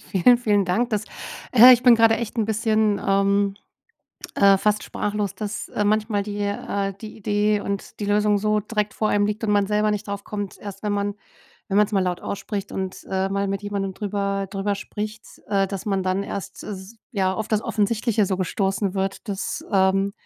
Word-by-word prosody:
Vielen, 220 +6 +5
vielen 205 -4 +2
Dank. 235 +7 0
Das, 210 -1 -1 0.5
äh 250 +1 +10
ich 245 +1 +4
bin 245 -2 +8
gerade 225 0 +5
echt 235 +1 -5
'n 220 - +2
bisschen, 215 -1 +1
ähm, 200 0 +2 0.8
äh, 200 -1 +6
fast 210 +1 +1
sprachlos, 205 -1 -3
dass, 210 +2 -5
äh, 210 - -1
manchmal 210 0 +1
die 205 0 -5
äh, 200 -1 -2
die 220 0 -9
Idee 210 0 +1
und 200 +1 -5
die 205 - -2
Lösung 210 0 +3
so 210 +1 +1
direkt 210 0 -2
vor 215 - 0
einem 205 0 +2
liegt 210 +2 -3
und 210 - 0
man 205 -1 +3
selber 210 +1 +1
nicht 210 0 -3
drauf 200 0 -4
kommt. 205 -2 -5
Erst 200 -1 -9
wenn 210 -1 -1
man 200 0 -1 0.5
wenn 195 - 0
man's 210 0 +3
mal 200 - +2
laut 180 -1 -2
ausspricht 200 0 -4
und, 190 -1 -4
äh, 190 0 0
mal 200 0 -1
mit 195 +1 -2
jemandem 200 -2 -3
drüber 200 -1 -2
drüber 200 +1 -1
spricht, 215 +2 -6 0.2
äh, 195 -1 +2
dass 195 -1 -5
man 195 -2 0
dann 185 +1 0
erst 195 -1 -6
s 195 +2 -8 0.2
ja, 190 -3 +1
auf 220 +1 -4
das 215 -1 +1
Offensichtliche 215 0 +1
so 190 0 -1
gestoßen 195 +1 -1
wird. 195 +3 -3
Das, 195 -1 -3
ähm, 195 +1 +3
205 Hz, 200 wpm, -23 LUFS, 195-215 Hz, 0.8 s, äh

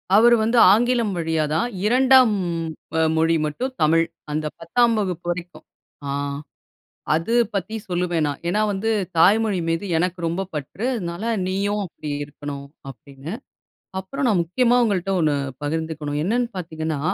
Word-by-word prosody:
அவர் 235 +3 +7
வந்து 230 +2 +1
ஆங்கிலம் 235 -1 +2
வழியா 160 -1 0
தான் 170 +9 +1 0.2
2ம் 255 0 +5 0.6
அ - - +3 0.2
மொழி 165 +1 +3
மட்டும் 250 - -3
தமிழ். 165 +2 +4 0.3
அந்த 155 +1 -2
10ம் 230 +8 +2
வகுப்பு 180 -4 -3
வரைக்கும். 175 0 -7 0.4
ஆ - - -1 1.0
அது 165 +9 -1 0.2
பத்தி 200 +3 -3
சொல்லுவேன் 175 -3 0
நான். 145 -1 -4
ஏன்னா, 210 +5 +1
வந்து 205 +3 -2 0.3
தாய்மொழி 205 +2 +4
மீது 165 +4 -1
எனக்கு 180 +1 -1
ரொம்ப 170 +4 -2
பற்று. 150 - -5
அதுனால 175 -2 -5 0.2
நீயும் 200 +2 -1
அப்பிடி 155 -3 -8 0.2
இருக்கணும் 140 -1 -8 0.2
அப்பிடின்னு. 140 +4 -9 0.7
அப்புறம் 275 +9 -4
நான் 205 -6 +3
முக்கியமா 235 +9 +2
உங்கள்ட்ட 195 -4 0
ஒண்ணு 155 -3 +2 0.3
பகிர்ந்துக்கணும். 155 -1 -3
என்னென்னு 235 +5 0
பார்த்தீங்கன்னா? 160 -3 -3
180 Hz, 135 wpm, -22 LUFS, 160-220 Hz, 1.0 s, அவர்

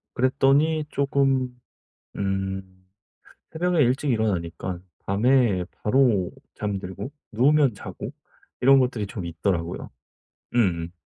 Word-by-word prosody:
그랬더니 140 +4 +3
쪼금 135 -3 +1 0.6
음 95 -1 -3 0.6
새벽에 175 0 +1
일찍 130 +4 +1
일어나니까 90 -5 -1 0.3
밤에 105 -3 +3 0.2
바로 110 -6 +3 0.2
잠들고 100 +4 -4 0.2
누우면 135 +2 +4
자고 - - -7 0.5
이런 135 +1 +7
것들이 120 -5 0
좀 95 -3 -6
있더라고요. 85 0 -2 0.7
음음. 85 -7 +1
110 Hz, 230 characters per minute, -25 LUFS, 95-135 Hz, 0.7 s, 이런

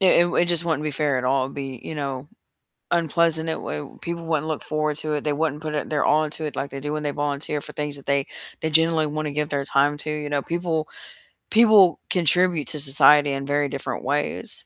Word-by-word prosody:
It 190 - +4
it - - +7
w 175 - -2
it 175 - +3
just 170 -1 +3
wouldn't 160 -3 -1
be 155 - -2
fair 145 -2 0
at 125 - -3
all. 130 0 +2
It'd 135 - -8
be, 135 -3 -6
you - - -6
know, 140 -2 -5 0.6
unpleasant, 165 -1 +2
it - - 0
w 75 - -7
people 170 -1 -5
wouldn't 155 -2 -1
look 155 -2 -3
forward 155 -1 -1
to 155 0 -1
it, 150 - -2
they 150 - 0
wouldn't 150 0 -2
put 155 -1 -4
it 150 - -3
their 150 -2 0
all 155 +1 +3
into 155 +1 -2
it 150 - -5
like 140 - -4
they 140 - -6
do 145 +2 -4
when 155 0 -3
they 145 - -1
volunteer 145 +1 -3
for - - -9
things 150 -1 -4
that 140 - -14
they 140 -1 +1 0.4
they 160 - -1
generally 160 0 +3
wanna 150 0 -3
give 150 +1 -2
their 140 -1 -1
time 145 +2 +2
to, 155 - -5
you 150 -1 -4
know, 145 -1 0
people 165 -1 -2 0.6
people 215 -6 +5
contribute 175 -2 +2
to 150 - -1
society 145 +1 +5
in 135 0 -3
very 145 +1 0
different 140 0 -5
ways, 145 +3 -1
150 Hz, 240 wpm, -23 LUFS, 140-160 Hz, 0.6 s, it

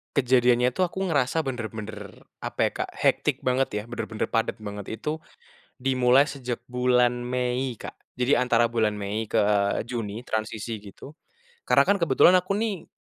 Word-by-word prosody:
Kejadiannya 125 -2 +3
tuh, 185 - +2
aku 190 +2 -2
ngerasa 145 -1 +1
bener-bener 110 - -6 0.2
apa - - -6
ya, - - -5
Kak, - - -9
hektik - - +1
banget 125 -4 +1
ya, 105 - -6
bener-bener 115 -2 -4
padet 115 -1 -1
banget. 105 -1 -7
Itu 155 +3 -4 0.5
dimulai 130 +1 +4
sejak 125 -5 -5
bulan 125 -1 +2
Mei, 125 0 -1
Kak. - - -8 0.2
Jadi 125 +1 +2
antara 120 -2 +2
bulan 110 -3 +1
Mei 105 +2 -3
ke 110 -1 +2 0.4
Juni, 115 -1 -5
transisi 110 0 -3
gitu, 100 +7 -12 0.6
karena - - +5
kan, 200 - +4
kebetulan 170 +2 +5
aku 185 +3 -2
nih, 210 -5 -2
125 Hz, 150 wpm, -25 LUFS, 110-135 Hz, 0.6 s, karena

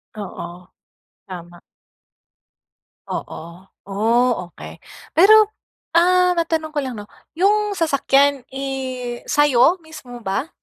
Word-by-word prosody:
Oo, 180 -3 -8 0.6
tama. 175 -2 -10 1.5
Oo, 170 +4 -8 0.2
oh, 225 +5 +2 0.2
okey. - - -12 0.3
Pero, 390 +6 +7 0.6
ah, 360 +1 +4
matanong 325 -2 -2
ko 295 - 0
lang 255 -4 -5
'no? 205 - -8 0.3
Yung 415 +1 +2
sasakyan, 280 -3 +2
eh, 260 -3 -5
sa'yo 290 +4 +4
mismo 255 - -12
ba 195 +11 -2
270 Hz, 95 wpm, -20 LUFS, 215-325 Hz, 1.5 s, Pero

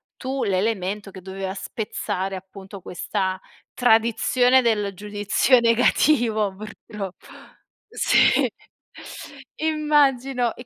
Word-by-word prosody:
tu 265 +1 -3
l'elemento 200 0 -1
che 190 -1 -11
doveva 190 0 -5
spezzare 195 -2 -4
appunto 190 +1 -11
questa 185 +2 -3 0.3
tradizione 245 +2 +3
del 210 -4 0
giudizio 205 +5 +2
negativo 230 -3 +2
purtroppo. 210 -2 -9 0.6
Si, - - +3 1.1
immagino, 275 -6 +1
e 245 - -11
215 Hz, 85 wpm, -23 LUFS, 195-245 Hz, 1.1 s, tradizione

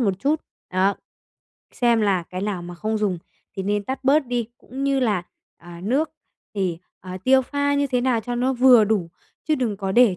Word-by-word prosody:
một 210 -5 +2
chút, 290 +7 +1 0.3
đó, 190 +2 +2 0.8
xem 235 -2 +2
là 195 -4 +2
cái 185 - -4
nào 200 -4 -2
mà 175 0 -8
không 215 +5 -2
dùng 200 -4 0 0.4
thì 190 - -2
nên 205 +1 -1
tắt 265 +4 -4
bớt 280 +1 +4
đi, 240 -2 -2
cũng 270 +2 -6
như 275 -1 +2
là, 210 -8 +1 0.4
à, 170 0 -11
nước 280 +9 +1 0.4
thì, 185 -5 -1 0.2
ờ, 185 - -10
tiêu 265 0 +5
pha 285 +2 0
như 285 0 +2
thế 255 -2 0
nào 245 -2 +1
cho 245 +3 -4
nó 250 +2 +1
vừa 250 -3 +6
đủ, 200 -5 0 0.4
chứ 310 - +4
đừng 245 -7 -1
có 195 -1 -3
để 235 -4 +5
225 Hz, 205 wpm, -23 LUFS, 195-260 Hz, 0.8 s, vừa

